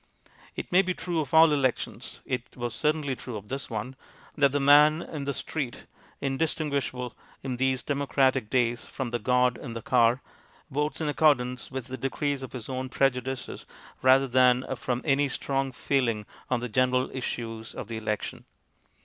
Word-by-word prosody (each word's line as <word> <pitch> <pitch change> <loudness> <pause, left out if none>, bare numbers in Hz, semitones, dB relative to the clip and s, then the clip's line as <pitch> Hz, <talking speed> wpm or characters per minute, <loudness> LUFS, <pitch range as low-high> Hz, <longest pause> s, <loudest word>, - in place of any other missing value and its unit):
It - - -6
may 180 +2 +6
be 185 -2 -2
true 175 -2 -2
of 145 -3 -3
all 160 0 +7
elections 130 -4 -2
it 125 -1 -4
was 120 -2 -3
certainly 150 +1 0
true 120 -2 -7
of 105 0 -11
this 135 +1 -4
one 115 +4 -4 0.4
that 140 -2 +4
the 145 - +1
man 150 +3 +6
in 145 -3 -6
the 140 - -1
street, 140 -7 -4 0.4
indistinguishable 140 -3 -2 0.3
in 130 -2 -3
these 130 0 +1
demo 140 -1 -2
cratic 130 -5 +2
days 120 -1 +1
from 130 -3 -5
the 120 - -1
god 125 +1 +2
in 120 -5 -7
the 115 - -5
car, 120 +1 +3 0.5
votes 150 +3 -1
in 155 - 0
accordance 135 -5 +2
with 130 -2 -5
the 130 +1 -6
decrees 135 +2 -1
of 130 - -8
his 125 -4 -6
own 130 0 -3
pre 135 +1 +3
judices, 125 0 -6 0.3
rather 130 +1 +5
than 125 0 +4
from 125 0 -3
any 145 -1 +3
strong 135 0 -1
feeling 120 -5 0 0.2
on 125 -2 +1
the 125 - -2
general 130 +2 +1
issues 115 -3 -5
of - - -6
the 115 0 -5
election. 105 -1 -3
130 Hz, 175 wpm, -27 LUFS, 125-140 Hz, 0.5 s, all